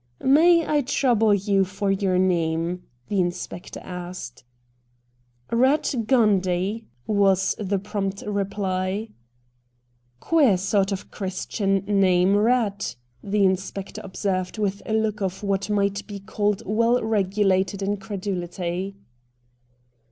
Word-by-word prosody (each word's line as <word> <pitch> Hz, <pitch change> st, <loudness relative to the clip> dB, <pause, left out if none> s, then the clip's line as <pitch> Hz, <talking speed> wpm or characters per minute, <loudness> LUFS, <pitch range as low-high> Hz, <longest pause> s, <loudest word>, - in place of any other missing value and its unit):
' 120 Hz, -, -42 dB, 0.2 s
May 340 Hz, 0 st, +5 dB
I 295 Hz, -1 st, +2 dB
trouble 245 Hz, -5 st, +2 dB
you 200 Hz, -1 st, +2 dB
for 195 Hz, +1 st, -2 dB
your 190 Hz, -2 st, +1 dB
name? 170 Hz, -1 st, 0 dB
' 120 Hz, 0 st, -41 dB
the 200 Hz, -2 st, +1 dB
inspector 175 Hz, 0 st, -4 dB
asked. 180 Hz, 0 st, -7 dB, 0.6 s
' 120 Hz, 0 st, -41 dB
Eatt 255 Hz, -1 st, +2 dB
Gundy/ 205 Hz, -3 st, +2 dB, 0.2 s
was 195 Hz, -2 st, +3 dB
the 200 Hz, -1 st, 0 dB
prompt 195 Hz, 0 st, -3 dB
reply. 200 Hz, 0 st, -2 dB, 0.5 s
' 120 Hz, 0 st, -43 dB
Queer 280 Hz, -, +3 dB
sort 195 Hz, +1 st, +1 dB
of 195 Hz, 0 st, -5 dB
Christian 195 Hz, +1 st, -2 dB
name, 190 Hz, -2 st, +3 dB
Eatt,' 205 Hz, -, +1 dB, 0.3 s
the 205 Hz, 0 st, +1 dB
inspector 190 Hz, +1 st, -2 dB
observed 185 Hz, 0 st, -2 dB
with 200 Hz, -1 st, -1 dB
a 220 Hz, -, -1 dB
look 220 Hz, -1 st, 0 dB
of 190 Hz, +1 st, -3 dB
what 195 Hz, 0 st, -1 dB
might 200 Hz, -1 st, 0 dB
be 205 Hz, -2 st, -7 dB
called 205 Hz, 0 st, -1 dB
well 230 Hz, +4 st, +2 dB
regulated 195 Hz, -2 st, +1 dB
incredulity. 195 Hz, -2 st, -3 dB
195 Hz, 120 wpm, -24 LUFS, 185-210 Hz, 0.6 s, May